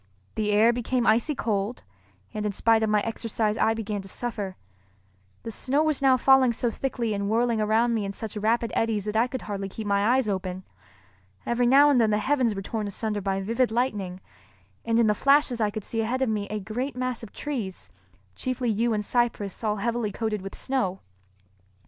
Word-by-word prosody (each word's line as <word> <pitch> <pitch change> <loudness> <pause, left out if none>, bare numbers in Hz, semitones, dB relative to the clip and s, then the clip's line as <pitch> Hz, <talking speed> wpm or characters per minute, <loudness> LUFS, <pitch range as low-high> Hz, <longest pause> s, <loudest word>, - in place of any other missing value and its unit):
The 215 -1 -1
air 220 +3 +5
became 245 0 -1
icy 235 +7 +2
cold, 215 -1 -2 0.5
and 210 - -3
in 210 - 0
spite 225 +2 +3
of 220 - +1
my 210 -1 +3
exercise 225 -1 -1
I 225 0 +2
began 210 -2 -3
to 195 - -12
suffer. 205 -3 -4 0.9
The 225 - -5
snow 275 +7 +1
was 310 -3 0
now 265 -2 +5
falling 260 -1 +5
so 235 +1 0
thickly 235 -3 -2
and 200 0 -2
whirling 230 0 +1
around 225 +3 +2
me 220 -2 0
in 195 - -3
such 220 +1 -7
rapid 225 +2 0
eddies 220 -3 0
that 210 0 -3
I 230 +3 +3
could 260 0 -6
hardly 195 -2 -4
keep 220 +3 -7
my 205 +4 +2
eyes 260 -4 0
open. 185 -2 -3 0.8
Every 240 +1 +1
now 285 +3 +6
and 250 -4 +4
then 220 - +3
the 210 - +2
heavens 250 -1 +1
were 195 - -5
torn 215 +1 -3
asunder 210 +1 -3
by 195 0 -1
vivid 230 +5 +1
lightning, 210 -6 -2 0.6
and 230 0 +1
in 235 - +5
the 210 - +4
flashes 275 0 +3
I 210 - +2
could 215 0 -6
see 225 +2 -1
ahead 250 +4 0
of 260 - 0
me 210 -2 -1
a 215 +1 -3
great 245 +8 -4
mass 255 -1 -2
of 225 - -10
trees, 235 -11 -5 0.4
chiefly 255 -2 -1
yew 230 +2 +1
and 210 -1 -2
cypress 235 -4 -1
all 210 -1 +1
heavily 230 0 -1
coated 215 -1 -2
with 195 +1 -7
snow. 220 -9 -1
225 Hz, 205 wpm, -26 LUFS, 210-245 Hz, 0.9 s, now